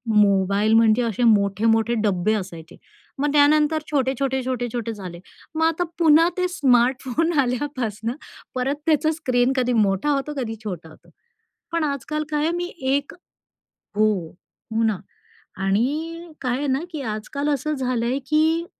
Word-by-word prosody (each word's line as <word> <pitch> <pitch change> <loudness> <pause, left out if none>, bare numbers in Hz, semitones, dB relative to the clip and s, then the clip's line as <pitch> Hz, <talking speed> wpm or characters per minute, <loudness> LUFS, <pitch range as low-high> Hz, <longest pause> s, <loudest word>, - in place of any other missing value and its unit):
Mobile 200 +1 +3
म्हणजे 225 +1 +5
असे 230 +1 -1
मोठे-मोठे 225 +2 +3
डब्बे 200 +1 +1
असायचे. 175 -5 -6 0.4
मग 290 +1 +1
त्यानंतर 300 +1 +4
छोटे-छोटे, 265 -1 0
छोटे-छोटे 240 -2 -3
झाले. 180 -4 -8 0.4
मग 320 - +1
आता 330 +2 +1 0.2
पुन्हा 325 0 +6
ते 365 0 +1
स्मार्टफोन 260 +1 +2
आल्यापासनं 245 -4 -2 0.4
परत 260 +3 0
त्याचा 315 0 +3
स्क्रीन 255 -5 +1
कधी 250 -1 +1
मोठा 205 +4 +2
होतो 280 +1 -1
कधी 225 -4 -3
छोटा 175 -6 -6
होतो. 155 - -19 0.6
पण 335 -1 0
आजकाल 300 +1 -2
काय 300 -1 0
आहे 330 - +1
मी 350 - -2 0.3
एक 285 0 -1 0.8
हो, 215 0 +5 0.6
हो 225 +1 +1
ना. 220 -3 +1 0.7
आणि 310 - -1
काय 250 -2 -1
आहे 290 - -2
ना, 265 0 +1
की 310 -4 -5
आजकाल 225 +6 -3
असं 295 +1 0
झालंय 255 -1 -1
की 315 +2 +2
255 Hz, 140 wpm, -23 LUFS, 220-295 Hz, 0.8 s, पुन्हा